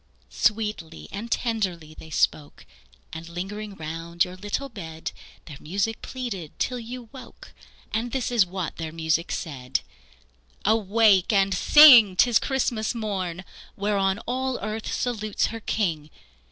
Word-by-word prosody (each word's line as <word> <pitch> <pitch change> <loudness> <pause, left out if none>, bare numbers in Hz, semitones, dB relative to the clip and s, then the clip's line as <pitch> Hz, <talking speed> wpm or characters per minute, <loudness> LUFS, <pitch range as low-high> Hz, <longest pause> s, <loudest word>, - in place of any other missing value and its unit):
Sweetly 210 -7 -1
and 220 +4 -6
tenderly 185 -10 -2
they 160 - -12
spoke, 150 -1 -1 0.5
And 160 +1 -7
lingering 200 +4 -6
round 165 +1 -2
your 180 0 -9
little 205 +8 -3
bed, 165 -10 -7 0.3
Their 150 -4 -10
music 200 +7 -2
pleaded 220 - -6
till 250 -1 -1
you 240 0 -8
woke, 265 - -13 0.4
And 235 +2 -2
this 255 -2 -2
is 235 -4 +5
what 185 -2 -5
their 160 -1 -5
music 160 +1 -1
said: 135 -5 -3 0.8
"Awake 215 -2 +4
and 195 -2 +3
sing! 240 -3 +8
'tis 235 +3 +4
Christmas 240 -4 -1
morn, 190 -5 -3 0.3
Whereon 200 -1 +1
all 260 +1 -1
earth 215 +1 -4
salutes 215 -4 -1
her 225 - -5
King! 165 -9 -2
200 Hz, 130 wpm, -25 LUFS, 170-230 Hz, 0.8 s, sing